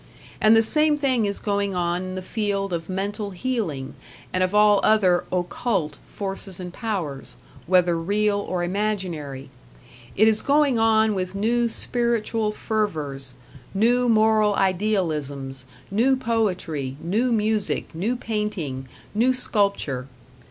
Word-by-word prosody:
And 215 +1 +6
the 225 - +5
same 300 +5 +3
thing 260 -7 +1
is 200 - -1
going 200 -2 -1
on 175 0 0
in 185 0 -5
the 185 - -5
field 200 -2 -2
of 165 0 -4
mental 200 +2 -3
healing, 185 - -3 0.4
and 185 - +1
of 185 +2 -1
all 210 -1 +6
other 190 -5 +3
"occult" 180 - -1
forces 195 -2 -6
and 180 -1 -7
powers, 180 - -4 0.3
whether 180 -1 +4
real 205 +4 +1
or 185 -3 -2
imaginary. 175 -9 -3 0.6
It 215 - +5
is 220 -1 +3
going 280 -4 +3
on 220 -1 +4
with 185 -1 -3
new 235 +3 +1
spiritual 230 -2 0
fervors, 150 - -3 0.4
new 240 +4 +3
moral 215 -2 +4
idealisms, 155 -10 -1 0.3
new 240 +7 +3
poetry, 185 - -1
new 215 +10 0
music, 215 -4 0
new 200 +10 -1
painting, 210 - -3 0.3
new 235 +5 +3
sculpture. 200 - 0
200 Hz, 130 wpm, -24 LUFS, 175-220 Hz, 0.6 s, And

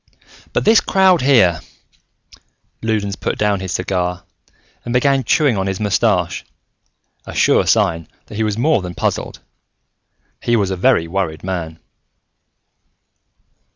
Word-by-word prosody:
"But - - -1
this 220 +1 +5
crowd 190 -3 +3
here!" 115 - +4 1.2
Loudons 105 -3 -1
put - - -3
down 105 -2 +1
his 95 -1 -5
cigar 90 -1 -2 0.6
and 120 - -4
began 135 +1 +2
chewing 135 -1 +2
on 95 - -1
his 95 -1 -3
mustache, 100 -4 0 0.8
a - - -8
sure - - +3
sign 85 -1 +1 0.2
that - - -13
he 110 - -3
was 105 -1 -1
more 135 -1 +2
than 90 -1 -7
puzzled: - - -3 1.0
he 120 - +1
was 100 -4 0
a - - -1
very 95 -3 +2
worried 85 -3 -3
man. 85 -4 -4
100 Hz, 130 wpm, -18 LUFS, 90-120 Hz, 1.2 s, this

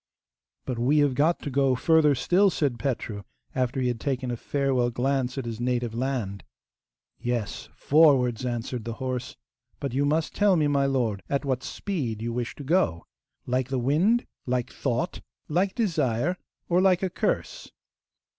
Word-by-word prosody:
'But 125 -3 -3
we 135 +6 +3
have 145 -2 +4
got 155 +6 +2
to 145 - -4
go 135 -1 +3
further 155 +1 +4
still,' 185 +9 +3
said 140 -9 -1
Petru, 115 -6 -2 0.3
after 130 0 -1
he 125 - +1
had 120 -2 -1
taken 130 -2 -2
a - - -1
farewell 130 -1 0
glance 130 +1 -1
at 135 - -3
his 115 -1 -5
native 120 -2 -1
land. 115 -6 -2 0.8
'Yes, 120 -3 -3
forwards,' 135 -6 +4
answered 120 -1 -3
the 115 0 -4
horse; 130 -2 -4 0.4
'but 140 -3 -3
you 140 +2 +1
must 155 +3 +1
tell 205 -2 +4
me, 155 -3 +2
my 140 -1 +2
lord, 120 -7 0
at 140 +1 -1
what 130 -2 0
speed 135 - -3
you 115 +1 -3
wish 120 0 -3
to 145 - -8
go. 135 - +1 0.4
Like 125 0 0
the 135 0 -2
wind? 165 - +2 0.2
Like 125 -1 -1
thought? - - -2 0.3
Like 185 +5 0
desire? 165 - +1 0.3
or 180 +1 +3
like 190 -1 +3
a 190 - +1
curse? - - -2
130 Hz, 165 wpm, -26 LUFS, 120-150 Hz, 0.8 s, have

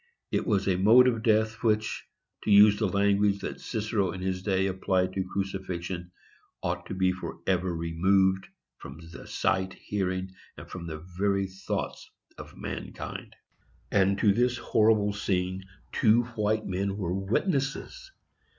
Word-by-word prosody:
It - - 0
was 100 -4 +1
a 95 -2 +2
mode 115 +7 +7
of 115 -3 +1
death 110 -1 +2
which, 110 -2 0 0.4
to - - -3
use 105 0 +7
the 110 - +2
language 100 +1 +2
that - - -5
Cicero 105 -5 -1
in 95 - -6
his 90 0 -2
day 95 -1 +1
applied 95 -1 0
to 95 - -1
crucifixion, 95 -2 -4 0.5
"ought - - -2
to - - -5
be 95 0 +2
forever 90 0 -2
removed 95 +4 +2 0.3
from 70 +4 -10
the - - -11
sight, 95 0 0
hearing, 95 -2 -3 0.2
and - - -10
from 85 -2 -7
the 80 0 -7
very 100 -1 +2
thoughts 95 0 -5 0.3
of - - -11
mankind." - - -7 0.6
And 100 -1 +3
to 105 -1 +4
this 120 +3 +1
horrible 110 -3 +2
scene 95 -2 -2 0.3
two 115 +2 +4
white 110 0 0
men 95 +1 -2
were 90 -4 -2
WITNESSES! 135 - -2
95 Hz, 145 wpm, -28 LUFS, 95-105 Hz, 0.6 s, mode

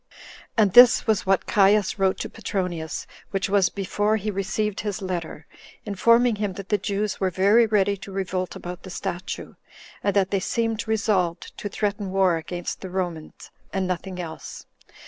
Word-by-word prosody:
And 205 -4 +4
this 245 +1 +8
was 215 -3 +1
what 195 -1 +2
Caius 205 0 +3
wrote 190 -1 +2
to - - -3
Petronius, 180 -7 -3 0.2
which 195 -1 -1
was 200 -2 +4
before 205 +2 0
he 210 0 -3
received 205 +1 -2
his 205 -1 -3
letter, 175 -5 -5 0.4
informing 230 +3 +3
him 205 -2 -2
that 195 +1 -9
the 210 - +2
Jews 200 +1 -2
were 190 - +1
very 200 +6 +4
ready 205 -2 +2
to 195 +1 -10
revolt 185 -1 -3
about 180 0 -7
the 185 - -10
statue, 185 +1 -5 0.5
and 200 - +1
that 195 -1 +2
they 200 - +2
seemed 225 +3 -1
resolved 195 -6 0
to 205 - -4
threaten 205 -1 -2
war 190 -3 +3
against 175 +2 -5
the 190 - -6
Romans, 175 -4 -5 0.2
and 190 -1 -1
nothing 185 0 -4
else. 165 -3 -7
195 Hz, 165 wpm, -24 LUFS, 185-210 Hz, 0.5 s, this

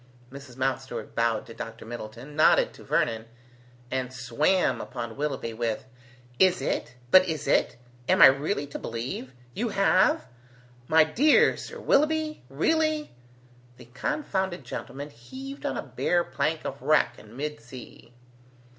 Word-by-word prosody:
Mrs. 140 -2 -11
Mountstuart 130 -3 -3
bowed 115 -2 0
to 115 - -11
Dr. 115 0 -8
Middleton, 120 +4 -8
nodded 155 - +4
to - - -14
Vernon, 110 0 0 0.6
and 130 -1 -2
swam 130 +9 +1
upon 115 -1 -6
Willoughby, 135 -5 -3
with, 115 0 -2 0.5
"Is 185 -1 +5
it? 130 -2 -2 0.2
But 185 0 +8
is 155 -4 -3
it? - - +2 0.3
Am - - +4
I - - +11
really 140 +4 +3
to 140 - -7
believe? 120 +3 -5 0.2
You 235 - -2
have? 200 - +3 0.6
My 160 0 +6
dear 255 - +4
Sir - - -8
Willoughby? 310 +1 +1
Really?" 310 - +1 0.7
The - - -13
confounded 190 - -2
gentleman 140 +3 -7
heaved 265 - -8
on - - -2
a - - -3
bare 175 -1 0
plank 155 +2 -2
of 135 +1 -5
wreck 155 0 +2
in 110 +3 -14
mid 150 +1 -4
sea. 120 0 -12
140 Hz, 140 wpm, -27 LUFS, 120-185 Hz, 0.7 s, I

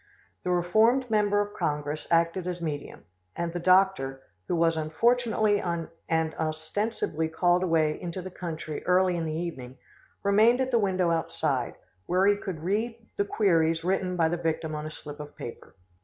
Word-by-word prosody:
The - - -2
reformed 220 +8 +3
member 205 -1 +3
of 205 0 -4
Congress 150 0 -2
acted 170 +2 +2
as 180 -1 -3
medium, 150 -4 -5 0.3
and 170 -1 -3
the 175 - -2
doctor, 185 -7 +3 0.2
who - - 0
was 165 -1 +3
unfortunately 215 +6 +2
and 170 -2 -3 0.5
ostensibly 160 +1 -2
called 175 +2 +2
away 160 -4 +1
into 175 0 -5
the 185 +1 -7
country 160 -4 -5
early 180 0 +4
in 165 -1 -2
the 155 - -2
evening, 130 -7 -5 0.5
remained 215 +5 +5
at 260 0 0
the 235 - +4
window 185 -4 +1
outside, 150 -6 -1 0.3
where 185 +2 +3
he 205 0 +5
could 185 -6 -6
read 220 +6 0 0.2
the 200 - +1
queries 165 -6 +2
written 185 0 0
by 165 -2 +3
the 175 +2 -1
victim 160 -1 -2
on 150 0 -4
a - - -5
slip 150 -1 -9
of 150 0 -9
paper. 120 - -9
175 Hz, 170 wpm, -27 LUFS, 160-200 Hz, 0.5 s, remained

